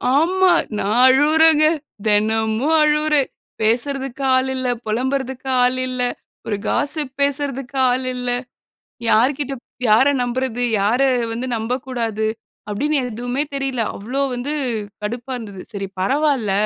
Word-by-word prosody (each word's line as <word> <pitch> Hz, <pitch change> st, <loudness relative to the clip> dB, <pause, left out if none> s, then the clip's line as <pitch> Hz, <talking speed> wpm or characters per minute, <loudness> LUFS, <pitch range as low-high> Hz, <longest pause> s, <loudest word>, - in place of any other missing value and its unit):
ஆமா, 370 Hz, +5 st, +3 dB, 0.3 s
நான் 210 Hz, +3 st, 0 dB
அழுவுறேங்க, 310 Hz, +4 st, +5 dB, 0.4 s
தெனமும் 220 Hz, +6 st, +2 dB
அழுவுறேன். 300 Hz, -2 st, +2 dB, 0.3 s
பேசுறதுக்கு 265 Hz, +4 st, 0 dB
ஆள் 260 Hz, 0 st, +1 dB
இல்ல, 260 Hz, -1 st, -2 dB, 0.2 s
புலம்புறதுக்கு 265 Hz, +3 st, -2 dB
ஆள் 250 Hz, +1 st, +2 dB
இல்ல, 255 Hz, -1 st, -3 dB, 0.5 s
ஒரு 210 Hz, -2 st, -1 dB
காஸ்ஸிப் 290 Hz, -2 st, 0 dB
பேசுறதுக்கு 275 Hz, -1 st, -1 dB
ஆள் 255 Hz, +1 st, -1 dB
இல்ல. 250 Hz, 0 st, -3 dB, 0.8 s
யார்கிட்ட 270 Hz, +5 st, +2 dB, 0.4 s
யார 220 Hz, +5 st, +6 dB, 0.2 s
நம்புறது, 245 Hz, 0 st, -2 dB, 0.2 s
யார 225 Hz, +6 st, +2 dB, 0.3 s
வந்து 240 Hz, +3 st, -3 dB
நம்பக்கூடாது? 230 Hz, -2 st, -2 dB, 0.4 s
அப்டின்னு 290 Hz, +9 st, 0 dB
எதுவுமே 245 Hz, +4 st, -2 dB
தெரியல. 270 Hz, -3 st, -1 dB, 0.2 s
அவ்ளோ 250 Hz, +7 st, -3 dB
வந்து 250 Hz, +4 st, -3 dB, 0.5 s
கடுப்பா 235 Hz, +4 st, -4 dB
இருந்தது. 200 Hz, -5 st, -8 dB
சரி 195 Hz, -1 st, -4 dB
பரவால்ல. 270 Hz, -1 st, +1 dB
255 Hz, 110 wpm, -20 LUFS, 225-280 Hz, 0.8 s, யார